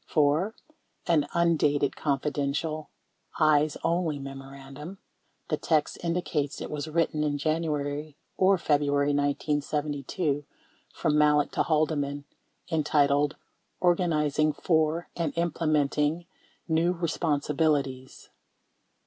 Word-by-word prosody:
28 -, -, -18 dB
4. 155 Hz, +8 st, +3 dB, 0.5 s
An 160 Hz, -4 st, +2 dB
undated 150 Hz, -4 st, +2 dB
"Confidential 150 Hz, +2 st, -2 dB, 0.5 s
Eyes 155 Hz, -1 st, +3 dB
Only" 165 Hz, -3 st, 0 dB
memorandum 135 Hz, +4 st, -9 dB, 0.5 s
(the -, -, +1 dB
text 155 Hz, -3 st, 0 dB
indicates 165 Hz, -4 st, -1 dB
it -, -, -6 dB
was 150 Hz, 0 st, -4 dB
written 155 Hz, -1 st, 0 dB
in 145 Hz, -1 st, 0 dB
January 150 Hz, -1 st, -2 dB, 0.2 s
or 190 Hz, +1 st, +4 dB
February 145 Hz, -3 st, +1 dB
1972) 145 Hz, +1 st, -1 dB, 0.5 s
from 150 Hz, 0 st, +1 dB
Malek 150 Hz, -1 st, +3 dB
to -, -, 0 dB
Haldeman 145 Hz, -2 st, 0 dB, 0.5 s
entitled 145 Hz, -2 st, +2 dB, 0.4 s
"Organizing 155 Hz, -4 st, +2 dB
For 160 Hz, +1 st, +1 dB
And 165 Hz, -2 st, -2 dB
Implementing 155 Hz, -1 st, +1 dB, 0.4 s
New 170 Hz, +2 st, +2 dB
Eespon 160 Hz, -3 st, -1 dB
sibilities." 140 Hz, -4 st, -1 dB
150 Hz, 100 wpm, -27 LUFS, 145-160 Hz, 0.5 s, or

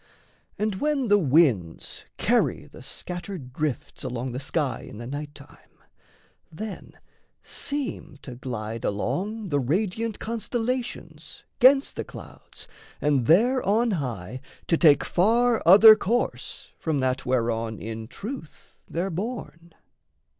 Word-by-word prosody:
And 210 Hz, -2 st, -2 dB
when 290 Hz, -5 st, +1 dB
the 205 Hz, 0 st, +6 dB
winds 130 Hz, -, +1 dB
Carry -, -, +1 dB
the -, -, -14 dB
scattered 175 Hz, -7 st, -7 dB
drifts 150 Hz, -2 st, -3 dB
along 125 Hz, +1 st, -3 dB
the 125 Hz, -, -4 dB
sky 140 Hz, -2 st, -1 dB
In -, -, -10 dB
the 120 Hz, -, -7 dB
night 145 Hz, +3 st, -6 dB
time, -, -, -17 dB, 0.7 s
then 210 Hz, +6 st, -7 dB, 0.5 s
seem 250 Hz, -, -5 dB
to 130 Hz, -, -8 dB
glide 115 Hz, -3 st, -5 dB
along 190 Hz, -, -2 dB
The 145 Hz, -2 st, +1 dB
radiant 200 Hz, -, -1 dB
constellations 235 Hz, +2 st, -4 dB, 0.2 s
'gainst 270 Hz, +2 st, +5 dB
the -, -, -2 dB
clouds -, -, -12 dB, 0.3 s
And 140 Hz, -5 st, +1 dB
there 245 Hz, +10 st, +5 dB
on 225 Hz, +4 st, +2 dB
high 125 Hz, -, -4 dB, 0.2 s
to 165 Hz, -, +2 dB
take 145 Hz, -4 st, +5 dB
far 230 Hz, +5 st, +2 dB
other 215 Hz, +4 st, +10 dB
course 235 Hz, +5 st, -2 dB
From 160 Hz, -3 st, -1 dB
that 130 Hz, 0 st, -1 dB
whereon 115 Hz, -3 st, 0 dB
in 110 Hz, +1 st, -6 dB
truth 200 Hz, -, -9 dB
they're 180 Hz, +4 st, -2 dB
borne. 170 Hz, -4 st, -6 dB
165 Hz, 125 wpm, -25 LUFS, -, 0.7 s, other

